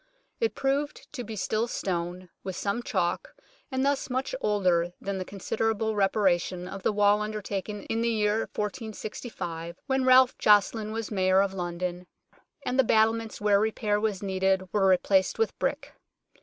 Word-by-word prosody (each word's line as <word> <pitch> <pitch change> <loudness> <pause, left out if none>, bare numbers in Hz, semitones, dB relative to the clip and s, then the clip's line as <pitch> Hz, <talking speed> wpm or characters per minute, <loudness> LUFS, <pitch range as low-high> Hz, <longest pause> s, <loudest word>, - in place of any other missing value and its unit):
It 455 - 0
proved 275 +1 -2
to 245 - -4
be 220 -1 -7
still 215 +3 0
stone, 180 -3 -3
with 190 -2 -5
some 200 +4 -1
chalk, 240 - -2 0.4
and 260 +1 0
thus 280 -1 0
much 260 - -2
older 180 -4 +2
than 195 -1 -3
the - - -2
considerable 220 +3 -1
reparation 185 -3 +1
of 195 +1 -7
the - - +1
wall 205 0 +3
undertaken 210 -1 -4
in 225 0 -2
the 235 - +2
year 215 -1 +1
1465, 210 -5 -5
when 265 -1 +1
Ralph 255 0 +6
Joceline 210 +1 +3
was 225 0 -4
Mayor 190 -1 +3
of 195 -1 -2
London, 180 0 -4 0.6
and 255 - -1
the - - +7
battlements 225 0 +2
where 205 -1 +3
repair 215 -1 0
was 210 -3 -1
needed 190 0 +1
were 200 -2 +3
replaced 190 +1 +3
with 450 - 0
brick. - - -2
210 Hz, 155 wpm, -27 LUFS, 190-225 Hz, 0.6 s, the